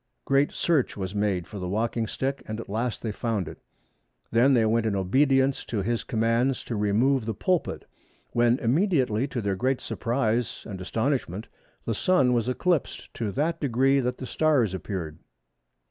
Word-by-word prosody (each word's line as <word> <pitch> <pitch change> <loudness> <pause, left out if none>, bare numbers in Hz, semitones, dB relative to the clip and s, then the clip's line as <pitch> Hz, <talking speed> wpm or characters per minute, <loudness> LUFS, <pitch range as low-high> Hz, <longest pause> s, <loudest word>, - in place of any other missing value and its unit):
Great 140 +1 +3
search 155 -11 +1
was 95 -1 -4
made 100 -4 0
for 105 - -8
the 90 -1 -4
walking 115 +2 -1
stick, 135 +5 -2
and 110 +1 -4
at - - -7
last 115 +3 -2
they 110 - -1
found 105 -3 -2
it. - - -9 0.7
Then 125 +4 +5
they 115 -2 +4
went 110 +1 +2
in 105 - 0
obedience 135 +7 +2
to 105 -4 -2
his 115 +3 -1
commands 115 +3 +1
to 120 - -4
remove 110 +6 +2
the 110 - -2
pulpit, 180 - -1 0.5
when 120 +1 +3
immediately, 135 - +1
to 130 -3 -3
their 100 -2 -1
great 130 +6 0
surprise 120 -2 -1
and 95 -4 -6
astonishment, 110 - -2 0.4
the 115 - 0
Sun 130 - +3
was 120 0 +1
eclipsed 170 +4 -1
to 110 -3 -3
that 155 +4 0
degree 135 0 +3
that 125 -1 -1
the 130 - -6
stars 135 - +2
appeared." 90 -5 -5
120 Hz, 170 wpm, -26 LUFS, 105-135 Hz, 0.7 s, Then